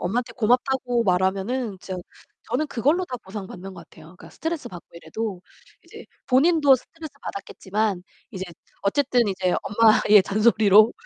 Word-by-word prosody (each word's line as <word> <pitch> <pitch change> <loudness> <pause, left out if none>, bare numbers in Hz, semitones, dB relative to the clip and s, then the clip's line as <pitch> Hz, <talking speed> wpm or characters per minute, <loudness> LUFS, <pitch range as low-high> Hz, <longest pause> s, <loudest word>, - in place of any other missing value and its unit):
엄마한테 235 +7 -2
고맙다고 245 +1 +1
말하면은 195 +4 0
진짜 185 -1 -6 0.5
저는 265 +6 0
그걸로 295 +8 +1
다 250 - -5
보상받는 190 -1 -8
것 170 -3 -13
같아요. 155 - -16
그러니까 175 +2 -15
스트레스 325 -1 -4
받고 175 -2 -11
이래도 180 +4 -6 0.4
이제 - - -13 0.2
본인도 290 +1 +4
스트레스 315 +4 -9
받았겠지만 200 0 -3 0.3
이제 190 -2 -5 0.4
어쨌든 245 +3 +1
이제 185 -2 0
엄마의 210 -1 +5
잔소리로 215 +1 +4
215 Hz, 375 characters per minute, -23 LUFS, 190-255 Hz, 0.5 s, 엄마의